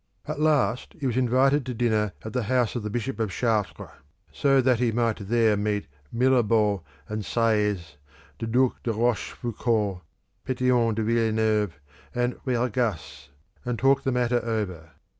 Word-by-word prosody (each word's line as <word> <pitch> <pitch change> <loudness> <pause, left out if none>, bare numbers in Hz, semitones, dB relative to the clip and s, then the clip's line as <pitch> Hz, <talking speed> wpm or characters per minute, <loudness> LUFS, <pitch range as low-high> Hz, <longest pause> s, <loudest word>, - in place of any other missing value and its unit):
At - - -4
last 145 -6 +1
he 140 - -4
was 125 -3 0
invited 130 +3 +3
to 125 - -3
dinner 110 -4 +1
at 110 - -6
the 125 - 0
house 125 -3 +1
of 120 - -2
the 105 - -4
Bishop 120 +3 -3
of 110 -2 0
Chartres, 110 0 -1 0.5
that 130 -4 +4
he 120 -2 +2
might 115 -1 0
there 115 -1 +3
meet 105 0 -1 0.3
Mirabeau 115 -5 +2 0.3
and 105 0 -3
Seiyes, 105 -9 0 0.4
the 115 - -3
Duc 125 +2 +1
de 120 - -1
Rochefoucauld, 110 -3 -1 0.5
Pétion 125 -3 +2
de 110 - -1
Villeneuve, 110 -6 +1 0.4
and 120 0 0
Bergasse, 120 - -2 0.3
and 125 -2 -2
talk 135 +3 +3
the 135 -1 -1
matter 120 -1 +1
over. 100 -8 -3
115 Hz, 145 wpm, -25 LUFS, 105-125 Hz, 0.5 s, that